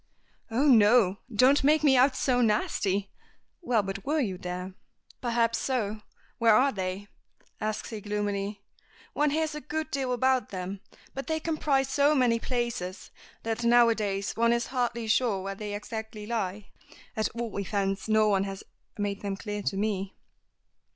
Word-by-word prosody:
"Oh, 240 Hz, +6 st, +1 dB
no. 215 Hz, -5 st, +5 dB
Don't 255 Hz, +6 st, +4 dB
make 305 Hz, +2 st, +4 dB
me 275 Hz, -3 st, +5 dB
out 260 Hz, +1 st, +4 dB
so 250 Hz, -2 st, +1 dB
nasty. 205 Hz, -3 st, 0 dB, 0.5 s
Well, 240 Hz, -10 st, +1 dB
but 195 Hz, 0 st, -5 dB
were 305 Hz, +3 st, 0 dB
you 195 Hz, -9 st, -2 dB
there?" 180 Hz, +1 st, -5 dB, 0.5 s
"Perhaps 230 Hz, -1 st, +1 dB
so. 220 Hz, -5 st, -2 dB, 0.4 s
Where 230 Hz, -2 st, +5 dB
are 275 Hz, +4 st, +4 dB
they?" 190 Hz, -1 st, -4 dB, 0.5 s
asks 215 Hz, +1 st, -3 dB
he 215 Hz, -2 st, -6 dB
gloomily. 205 Hz, -1 st, -3 dB, 0.5 s
"One 300 Hz, 0 st, +2 dB
hears 310 Hz, +1 st, 0 dB
a 300 Hz, -, -6 dB
good 315 Hz, +1 st, -4 dB
deal 265 Hz, -2 st, -1 dB
about 260 Hz, +1 st, +1 dB
them, 190 Hz, +1 st, -5 dB, 0.3 s
but 270 Hz, -, -6 dB
they 315 Hz, -1 st, 0 dB
comprise 300 Hz, -4 st, 0 dB
so 285 Hz, +2 st, +3 dB
many 245 Hz, -4 st, +3 dB
places 230 Hz, -7 st, -3 dB, 0.3 s
that 225 Hz, +1 st, -2 dB
now 235 Hz, 0 st, +6 dB
a -, -, +4 dB
days 200 Hz, -3 st, -2 dB
one 235 Hz, +2 st, +3 dB
is 235 Hz, 0 st, 0 dB
hardly 240 Hz, -2 st, -1 dB
sure 220 Hz, -3 st, +1 dB
where 195 Hz, 0 st, -3 dB
they 205 Hz, +1 st, -5 dB
exactly 220 Hz, 0 st, -6 dB
lie. 210 Hz, -3 st, -3 dB, 0.5 s
At 220 Hz, -1 st, 0 dB
all 235 Hz, -3 st, -4 dB
events 195 Hz, 0 st, -2 dB
no 215 Hz, 0 st, +4 dB
one 195 Hz, -2 st, +2 dB
has 195 Hz, 0 st, -6 dB, 0.3 s
made 205 Hz, -1 st, -2 dB
them 200 Hz, -1 st, -3 dB
clear 210 Hz, 0 st, -4 dB
to 195 Hz, -, -2 dB
me." 200 Hz, -2 st, -2 dB
220 Hz, 165 wpm, -28 LUFS, 200-255 Hz, 0.5 s, now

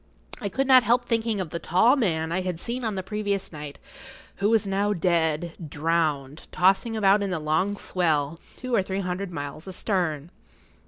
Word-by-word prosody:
I 200 Hz, -, -2 dB
could 270 Hz, +8 st, 0 dB
not 260 Hz, -1 st, +7 dB
help 240 Hz, +1 st, +2 dB
thinking 225 Hz, -3 st, 0 dB
of 180 Hz, -4 st, -4 dB
the 170 Hz, -, -3 dB
tall 225 Hz, -, +4 dB
man 165 Hz, -, 0 dB
I 185 Hz, +2 st, 0 dB
had 180 Hz, -2 st, -3 dB
seen 245 Hz, +6 st, -3 dB
on 220 Hz, -3 st, -1 dB
the 190 Hz, -, -3 dB
previous 200 Hz, -1 st, -2 dB
night, 150 Hz, -2 st, -8 dB, 0.6 s
who 200 Hz, +1 st, +1 dB
was 225 Hz, -2 st, +3 dB
now 200 Hz, +1 st, 0 dB
dead, 170 Hz, -2 st, 0 dB, 0.2 s
drowned, 155 Hz, -2 st, -1 dB
tossing 195 Hz, +5 st, +2 dB
about 200 Hz, 0 st, +4 dB
in 200 Hz, -, -1 dB
the 180 Hz, -, -1 dB
long 160 Hz, +7 st, 0 dB
swell, 160 Hz, -5 st, 0 dB, 0.2 s
two 255 Hz, -1 st, -5 dB
or 215 Hz, -, +4 dB
three 190 Hz, +1 st, -3 dB
hundred 185 Hz, +1 st, -3 dB
miles 145 Hz, +1 st, -6 dB
astern. 175 Hz, -5 st, -2 dB
185 Hz, 180 wpm, -25 LUFS, 160-210 Hz, 0.6 s, not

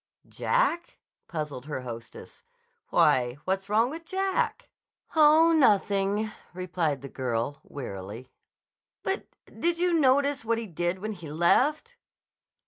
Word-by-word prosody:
"Jack?" 405 Hz, -9 st, 0 dB, 0.3 s
puzzled 150 Hz, -5 st, -5 dB
her 145 Hz, -4 st, -4 dB
hostess. 115 Hz, -2 st, -9 dB, 0.5 s
"Why, 125 Hz, 0 st, +3 dB
what's 190 Hz, +1 st, -1 dB
wrong 225 Hz, +4 st, +3 dB
with 325 Hz, +2 st, -7 dB
Jack?" 385 Hz, +7 st, -1 dB, 0.4 s
"Oh, 315 Hz, +2 st, +6 dB
nothing," 205 Hz, -5 st, +2 dB, 0.2 s
replied 175 Hz, -6 st, -1 dB
the -, -, -5 dB
girl 130 Hz, +1 st, -2 dB
wearily. 110 Hz, -1 st, -8 dB, 0.7 s
"But—did 345 Hz, -3 st, -3 dB
you 355 Hz, 0 st, +2 dB
notice 280 Hz, -2 st, +3 dB
what 230 Hz, 0 st, 0 dB
he 230 Hz, -, -4 dB
did 175 Hz, -1 st, -2 dB
when 215 Hz, +3 st, -4 dB
he 170 Hz, -6 st, -9 dB
left?" 295 Hz, -, +2 dB
200 Hz, 115 wpm, -27 LUFS, -, 0.7 s, Oh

